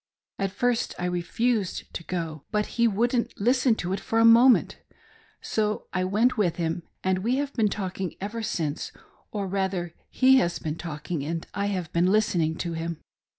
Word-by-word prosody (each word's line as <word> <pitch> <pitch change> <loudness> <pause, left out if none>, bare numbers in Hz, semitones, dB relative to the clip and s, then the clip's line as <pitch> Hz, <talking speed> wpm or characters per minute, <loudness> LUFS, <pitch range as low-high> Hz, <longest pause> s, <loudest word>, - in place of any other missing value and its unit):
At 195 0 0
first 235 +4 0
I 180 - -3
refused 185 +4 -1
to 170 - -5
go, 165 -4 -4
but 210 0 0 0.2
he 235 - +6
wouldn't 235 +3 0
listen 250 +2 +3
to 180 -3 -3
it 195 - -2
for 225 - -2
a 225 - +6
moment. 235 +2 +6 0.6
So 215 -1 -1
I 185 0 0
went 215 +5 +2
with 175 -5 +2
him, 165 0 -2 0.2
and 185 0 +1
we 235 +6 +1
have 280 0 -2
been 220 -4 +2
talking 190 -2 -4
ever 210 +4 -4
since; 165 -9 -2 0.4
or 205 -2 -3
rather 190 -3 -2 0.2
he 265 0 +5
has 175 -8 +1
been 155 0 -4
talking, 155 -2 -4
and 165 +2 -3
I 200 0 -1
have 185 -5 -3
been 175 +2 +3
listening 175 -7 +2
to 170 - -3
him. 165 0 -3
195 Hz, 180 wpm, -26 LUFS, 170-225 Hz, 0.6 s, he